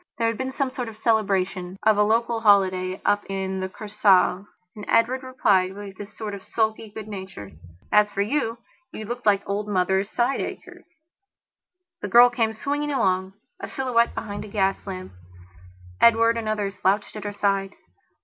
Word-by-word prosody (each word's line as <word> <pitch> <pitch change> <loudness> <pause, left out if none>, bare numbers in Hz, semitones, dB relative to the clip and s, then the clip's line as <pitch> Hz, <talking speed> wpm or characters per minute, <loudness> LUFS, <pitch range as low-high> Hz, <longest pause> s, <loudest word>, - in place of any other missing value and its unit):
There 230 - +1
had 230 - -3
been 260 0 -2
some 270 0 -2
sort 250 -3 -4
of 215 - -12
celebration 195 -5 0
of 220 0 +5
a 210 - +2
local 230 +2 +1
holiday 190 -3 +3
up 205 0 +2
in 190 -1 -3
the 190 0 -3
Kursaal. 200 -2 +2 0.3
And 210 - -9
Edward 245 +3 +2
replied 195 -8 +1
with 200 -1 -9
his 205 0 -10
sort 215 -2 -5
of 200 - -7
sulky 220 +1 -2
good 215 0 -9
nature: 190 - -8 0.4
"As 210 0 +5
for 200 0 -1
you, 230 0 -1 0.3
you 215 - -7
looked 240 +1 -5
like 200 -1 +3
old 205 +1 -2
Mother 190 -1 +1
Sideacher." 240 +6 -3 1.2
The - - -3
girl 245 +1 +7
came 225 -2 0
swinging 290 +5 -2
along, 190 -7 0 0.3
a - - -6
silhouette 245 -3 0
beneath 205 -2 -5
a - - -10
gas 195 -1 -1
lamp; 185 -1 -6 0.9
Edward, 230 0 +5
another, 215 -3 -2
slouched 195 +3 -1
at 210 - -6
her 205 - -4
side. 195 -1 -1
210 Hz, 170 wpm, -24 LUFS, 195-230 Hz, 1.2 s, girl